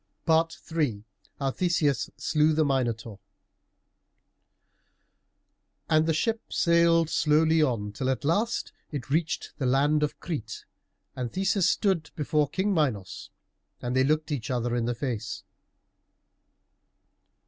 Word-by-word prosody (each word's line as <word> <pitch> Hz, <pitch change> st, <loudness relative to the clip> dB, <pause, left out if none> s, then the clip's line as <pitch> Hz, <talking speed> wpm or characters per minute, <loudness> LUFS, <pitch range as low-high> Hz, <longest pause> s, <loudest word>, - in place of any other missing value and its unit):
III 160 Hz, -7 st, 0 dB, 0.3 s
HOW 135 Hz, -1 st, -1 dB
THESEUS 165 Hz, -5 st, +1 dB
SLEW 155 Hz, 0 st, +2 dB
THE 155 Hz, 0 st, +2 dB
MINOTAUR 115 Hz, -6 st, -1 dB, 2.7 s
And 155 Hz, 0 st, +4 dB
the 160 Hz, -, +2 dB
ship 225 Hz, +7 st, 0 dB
sailed 170 Hz, -1 st, +4 dB
slowly 160 Hz, +1 st, +3 dB
on, 115 Hz, -8 st, 0 dB
till 130 Hz, +5 st, -2 dB
at 130 Hz, 0 st, -1 dB
last 215 Hz, +9 st, 0 dB, 0.2 s
it 135 Hz, -3 st, -6 dB
reached 160 Hz, +2 st, -1 dB
the 130 Hz, -, 0 dB
land 145 Hz, +4 st, +3 dB
of 150 Hz, -, -2 dB
Crete, 140 Hz, -11 st, -5 dB, 0.5 s
and 125 Hz, -2 st, -4 dB
Theseus 190 Hz, -1 st, +2 dB
stood 190 Hz, -6 st, +1 dB
before 150 Hz, -1 st, +1 dB
King 195 Hz, +5 st, 0 dB
Minos, 110 Hz, -, -1 dB, 0.5 s
and 125 Hz, +1 st, -3 dB
they 130 Hz, -, +4 dB
looked 155 Hz, +3 st, 0 dB
each 125 Hz, -7 st, -3 dB
other 120 Hz, -1 st, -1 dB
in 120 Hz, -1 st, 0 dB
the 120 Hz, 0 st, -1 dB
face. 115 Hz, -4 st, -4 dB
150 Hz, 120 wpm, -27 LUFS, 125-165 Hz, 2.7 s, And